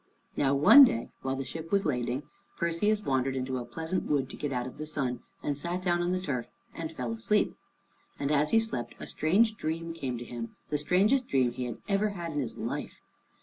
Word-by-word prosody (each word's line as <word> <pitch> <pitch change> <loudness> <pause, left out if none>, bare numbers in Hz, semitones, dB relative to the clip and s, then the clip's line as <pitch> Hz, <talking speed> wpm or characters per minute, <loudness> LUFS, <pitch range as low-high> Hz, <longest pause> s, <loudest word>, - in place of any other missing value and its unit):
Now 140 -1 +2
one 155 - +10
day, 115 - +2
while 130 0 -1
the 135 0 -4
ship 165 +3 -7
was 200 -1 +2
lading, 125 -1 -1 0.3
Perseus 205 +6 +1
wandered 135 -2 0
into 130 0 -2
a 120 - -5
pleasant 160 +9 -3
wood 140 -3 0
to - - -7
get 145 - -3
out 125 -2 -1
of 130 - -9
the 155 - -4
sun, 130 -5 -1 0.2
and 145 - 0
sat 175 +5 -2
down 175 -1 +2
on 175 +1 0
the 185 - +1
turf 140 -10 -3 0.3
and 165 -1 -5
fell 125 -7 -4
asleep. 115 - +1 0.6
And 140 +1 -1
as 150 0 +3
he 225 - +4
slept 130 - -1
a - - -6
strange 215 +8 +2
dream 165 +1 -3
came 135 -7 -3
to 120 - -7
him, 115 -1 -6
the 150 - 0
strangest 205 - +3
dream 130 -3 +2
he 125 +1 -4
had 120 - -5
ever 205 +1 +2
had 170 -1 -4
in 145 - -2
his 125 -5 -3
life. - - -4
150 Hz, 220 wpm, -29 LUFS, 130-175 Hz, 0.6 s, one